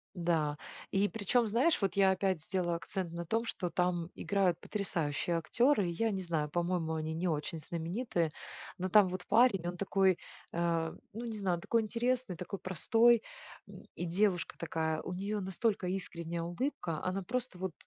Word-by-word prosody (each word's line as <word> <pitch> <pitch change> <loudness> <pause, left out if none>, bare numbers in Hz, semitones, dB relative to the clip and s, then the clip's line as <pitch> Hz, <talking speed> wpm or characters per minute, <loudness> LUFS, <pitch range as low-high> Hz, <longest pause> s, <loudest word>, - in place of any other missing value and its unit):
Да, 160 -4 +1 0.3
и 195 +1 +3
причем, 225 +3 +1
знаешь, 250 +7 +3
вот 195 - +1
я 195 -1 +5
опять 190 -3 0
сделаю 175 -2 -1
акцент 175 0 -4
на 170 0 -4
том, 225 +7 0
что 180 -5 -2
там 175 -1 0
играют 190 -4 +1
потрясающие 170 -5 -1
актеры. 225 - +3
Я 220 +6 0
не 190 -1 -2
знаю, 160 -4 -1
по-моему, 170 -1 0
они 155 0 -2
не 175 +2 -1
очень 155 +2 -2
знаменитые, 170 - -2 0.5
но 185 +1 -2
там 205 0 +7
вот 180 0 -5
парень- 225 -7 +4
он 175 - -4
такой, 190 -1 +3 0.3
э, 170 -1 0 0.2
ну, 230 +3 -5
не 225 -2 -4
знаю, 180 -4 0
такой 230 -1 +2
интересный, 240 -2 0
такой 180 +3 -5
простой. 225 +6 +4 0.5
М, - - -12
и 175 - -3
девушка 180 0 +1
такая: 160 -1 -1
у 180 - -5
нее 200 +3 -2
настолько 190 0 0
искренняя 170 -3 -3
улыбка, 170 - -2
она 185 +1 -1
просто 250 -3 -2
вот 185 -2 -3
185 Hz, 170 wpm, -33 LUFS, 170-205 Hz, 0.5 s, там